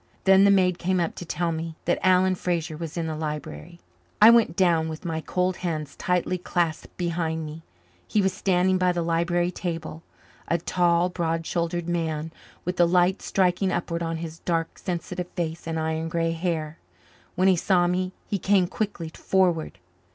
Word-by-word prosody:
Then 190 +1 +6
the - - +6
maid 180 -3 +3
came 185 +1 +1
up 170 - 0
to 175 - -8
tell 170 +1 -1
me 165 0 -4
that 175 - +1
Alan 185 0 +4
Fraser 175 -3 -2
was 165 +1 -6
in 165 - -1
the 160 -1 -3
library. 150 - -6 0.4
I 215 +2 +9
went 230 -8 +4
down 170 -4 +2
with 160 +3 -7
my 160 -1 -2
cold 180 +2 -1
hands 155 -5 -4
tightly 180 0 0
clasped 170 -2 -2
behind 165 -2 -2
me. 155 +2 -8 0.5
He 215 - +1
was 190 -2 +2
standing 185 -1 +2
by 180 -1 +3
the 170 -1 -1
library 170 +1 +1
table, 165 -3 -5 0.5
a 170 - +2
tall, 175 +1 +2
broad 165 -2 -2
shouldered 170 0 -2
man, 160 -2 -2 0.3
with 180 +1 -2
the 175 - +5
light 180 +2 +3
striking 185 0 +1
upward 170 -1 -2
on 165 -1 -2
his 165 0 -7
dark, 165 -2 -2
sensitive 180 0 -4
face 165 -1 -3
and 160 0 -2
iron 160 +1 -2
grey 165 0 0
hair. 165 -2 -3 0.6
When 185 +2 +3
he 190 - +5
saw 180 0 +2
me 185 +1 0 0.2
he 200 - -1
came 190 0 +3
quickly 175 -3 -3
forward. 175 - 0
175 Hz, 180 wpm, -25 LUFS, 165-180 Hz, 0.6 s, I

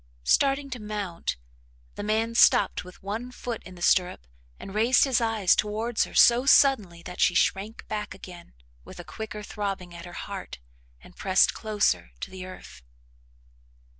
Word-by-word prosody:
Starting 275 - +2
to 250 - -5
mount, 205 - -4 0.6
the - - -7
man 220 +2 0
stopped 205 -4 +4
with 180 +1 -15
one 225 +5 -5
foot 240 -2 -6
in 185 - -12
the 175 - -8
stirrup 180 - +2 0.3
and 195 - -9
raised 230 +4 +4
his 260 -4 +2
eyes 220 -5 +2
towards 215 +2 -1
her - - -13
so 240 +1 +6
suddenly 215 -12 +4
that 180 - -7
she 175 - +3
shrank 205 +5 0
back 210 -3 -4
again 180 -2 -12 0.3
with - - -12
a - - -7
quicker 215 -1 -7
throbbing 195 -4 -5
at 170 0 -9
her 175 - -10
heart 195 +1 -7 0.4
and - - -17
pressed 190 -1 +3
closer 195 - -1
to - - -6
the 185 -1 -8
earth. 185 - -12
210 Hz, 165 wpm, -26 LUFS, 185-225 Hz, 0.6 s, so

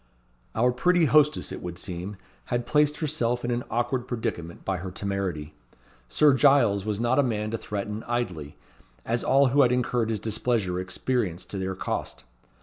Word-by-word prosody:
Our 125 +3 +3
pretty 175 +7 +3
hostess, 150 0 +3
it - - -6
would 85 -1 -6
seem, 90 +3 -5 0.3
had 120 0 -2
placed 150 +2 +2
herself 125 -6 -1
in 120 - -1
an 120 0 -1
awkward 120 +2 -1
predicament 85 -9 -4
by 95 -1 0
her 95 +2 -5
temerity. 95 -6 -3 0.5
Sir 150 - +4
Giles 130 -8 +4
was 105 -1 -2
not 120 +3 +2
a - - +7
man 110 -5 -1
to 115 - -1
threaten 105 +1 -4
idly, 95 -12 -3 0.5
as 120 +1 -1
all 135 0 +4
who 140 +3 +4
had 125 -3 +4
incurred 125 -2 0
his 110 -2 -1
displeasure 110 -4 0
experienced 95 0 -2
to 100 - -3
their 95 0 -2
cost. - - -4
115 Hz, 170 wpm, -26 LUFS, 95-125 Hz, 0.5 s, a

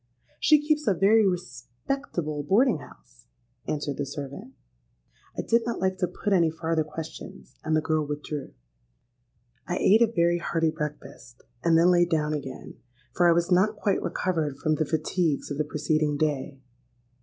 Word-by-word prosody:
—'She 305 -1 +5
keeps 300 -3 +1
a 200 - +3
very 205 +4 +4
respectable 155 - -4
boarding 195 - +3
house,' - - -17 0.4
answered 145 -2 -3
the 145 - -2
servant.—I - - -10
did 235 +1 +2
not 235 0 -3
like 190 0 -1
to 180 - +1
put 200 +3 -2
any 170 -4 +4
farther 160 0 -1
questions; 155 +1 -9
and 155 - 0
the 155 - +2
girl 155 -1 0
withdrew. 150 0 -5 1.2
"I 175 - -1
ate 215 +4 +4
a 235 - +6
very 175 -5 +1
hearty 165 -2 0
breakfast, 145 -5 -8 0.2
and 165 -1 +4
then 170 +2 +5
lay 175 -1 +4
down 155 -3 0
again; 135 -3 -7 0.3
for 175 -1 +4
I - - +6
was 170 +2 0
not 195 +4 +3
quite 205 -1 0
recovered 160 -6 -2
from 155 - 0
the 155 0 0
fatigues 160 -1 -1
of 145 - -4
the 150 - +1
preceding 150 0 0
day. 145 -2 -2
160 Hz, 160 wpm, -26 LUFS, 145-180 Hz, 1.2 s, a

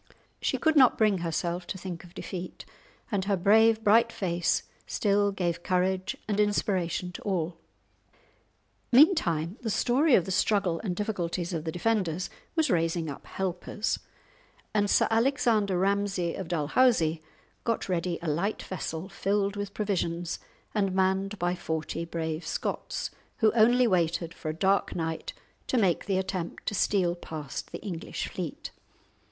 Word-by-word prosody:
She - - +1
could 315 -1 +2
not 260 -4 +6
bring 210 -4 +3
herself 170 +1 -2
to - - -4
think 175 -2 -6
of 175 -1 -16
defeat, 185 -1 -6 0.5
and 195 -3 0
her 200 -1 +1
brave, 220 +4 +5
bright 230 +2 +5
face 175 -4 0 0.2
still 205 -1 +2
gave 175 -4 -2
courage 185 +1 0
and 210 -1 0
inspiration 185 -4 0
to - - -9
all. 175 -4 -2 1.3
Meantime 220 - +4
the 230 - -2
story 250 +6 +3
of 175 - +3
the 190 - -4
struggle 190 -3 +1
and 185 -5 -2
difficulties 180 -3 -2
of 160 -1 -3
the 160 - -1
defenders 180 -2 0 0.2
was 315 -6 +2
raising 165 -2 0
up 140 - -10
helpers, 190 +3 -2 0.7
and 205 -1 +2
Sir - - +4
Alexander 225 -5 +2
Ramsay 195 -2 +1
of 190 - -5
Dalhousie 165 - +2 0.4
got 230 -1 -1
ready 175 -2 -1
a - - -3
light 170 +8 -1
vessel 175 -2 -4
filled 200 +1 0
with 205 -1 -5
provisions 175 -5 -1 0.3
and 195 -3 0
manned 190 +2 +1
by 175 -1 0
forty 160 -1 -3
brave 160 -1 -3
Scots, - - -3 0.3
who 220 -2 +4
only 240 +2 +5
waited 170 -4 +1
for 155 - -6
a 155 - -3
dark 195 +3 +1
night 165 -1 -3 0.3
to 255 - +1
make 190 -7 +2
the 195 -2 +1
attempt 185 -2 -3
to - - -1
steal 185 -3 +2
past 155 -5 -7
the - - -7
English 175 -5 -4
fleet. 175 -5 -5
190 Hz, 150 wpm, -28 LUFS, 170-210 Hz, 1.3 s, not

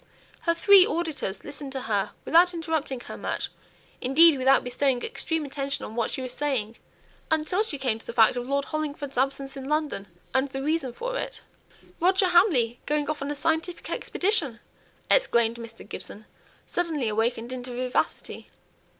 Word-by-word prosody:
Her 335 - +4
three 395 +2 +8
auditors 325 - -2
listened 285 -1 -6
to 265 - -3
her 205 -4 -1
without 350 +2 +5
interrupting 315 -6 -2
her - - -8
much - - -3 0.5
indeed, 305 +5 +6
without 265 +1 +4
bestowing 250 0 0
extreme 325 -9 -2
attention 275 0 -4
on 220 - -9
what 235 -2 0
she 260 - -4
was 255 -1 -5
saying, 250 -7 -2 0.5
until 315 +5 +1
she 430 -10 -3
came 250 -5 -1
to - - -17
the - - -3
fact 230 0 +5
of 245 +1 -4
Lord 280 0 +1
Hollingford's 290 -2 -4
absence 275 0 -1
in 270 0 -6
London, 300 -10 -1 0.3
and 265 +1 +2
the 270 0 -4
reason 300 -3 0
for - - -4
it. - - -5 0.6
"Roger 375 +2 +4
Hamley 300 - +4
going 295 0 +1
off 300 - -6
on 280 - -3
a 295 - -2
scientific 325 +3 -1
expedition!" 345 - 0 0.5
exclaimed 235 - +3
Mr. 230 -1 -10
Gibson, 215 +2 -8 0.4
suddenly 320 -8 -1
awakened 225 +3 -1
into 250 0 -6
vivacity. 250 +1 -2
275 Hz, 165 wpm, -26 LUFS, 245-320 Hz, 0.6 s, three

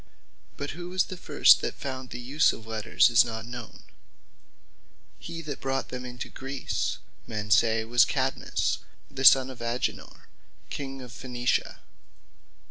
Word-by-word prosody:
But 145 - -4
who 175 +3 -7
was 185 0 +2
the 185 - -7
first 175 - +5
that - - -3
found 130 -2 -6
the 120 - -6
use 135 +5 +2
of 110 - -10
Letters, 110 -1 +2
is 120 - +7
not 115 -2 -5
known. 120 -1 -9 1.4
He 165 0 -7
that 145 -3 -5
first - - -26
brought 135 0 -2
them 125 0 -6
into 125 -1 -6
Greece, 135 0 -3 0.3
men 105 -1 -4
say 110 +1 +4
was 120 +2 +5
Cadmus, - - -1 0.3
the 135 -1 -4
sonne 135 0 +7
of 125 -2 -11
Agenor, 120 +2 -3 0.4
King 135 -2 -5
of 125 - -11
Phaenicia. 125 0 -2
125 Hz, 150 wpm, -27 LUFS, 115-135 Hz, 1.4 s, is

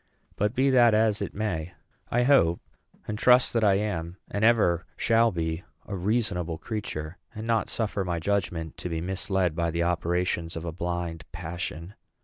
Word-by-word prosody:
But 105 +4 0
be 135 +1 +3
that 120 -4 +6
as 110 -1 +2
it 100 - -4
may, 90 -6 -3 0.3
I 120 +1 +2
hope 120 -11 +4 0.5
and 105 0 -3
trust 125 0 +5
that 115 -2 +2
I 100 -2 +5
am, 95 -4 -2
and 100 - -1
ever 105 -7 +4
shall 115 0 +3
be, 80 -1 -2 0.2
a 100 - -5
reasonable 90 -4 -1
creature, 90 -6 -5 0.2
and 110 +1 -5
not 115 -2 +1
suffer 105 -3 -1
my 90 -2 -2
judgment 85 -3 -2
to 90 - -5
be 80 -1 -2
misled 95 -1 -1
by 85 0 0
the 85 +1 0
operations 85 0 0
of 80 0 -5
a 85 - -3
blind 85 0 -3
passion. 85 +1 -5
90 Hz, 170 wpm, -27 LUFS, 85-110 Hz, 0.5 s, that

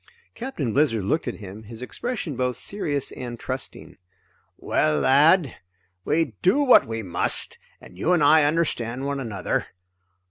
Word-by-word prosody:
Captain 225 - -4
Blizzard 135 -8 +2
looked 155 +11 0
at - - -3
him, 100 +1 -10
his 110 +2 -9
expression 195 - -4
both 125 -1 -1
serious 145 -8 -2
and 120 -2 -7
trusting. - - -6 0.6
"Well 75 -1 +1
lad, 150 +2 +4 0.5
we 160 - 0
do 185 +9 +3
what 255 - +6
we 115 0 -4
must, 85 -3 -1 0.2
and - - -15
you 165 - +1
and 175 -4 +3
I 155 +1 +6
understand 135 -5 -1
one 140 0 -2
another. 110 -7 -2
135 Hz, 145 wpm, -24 LUFS, 115-160 Hz, 0.6 s, what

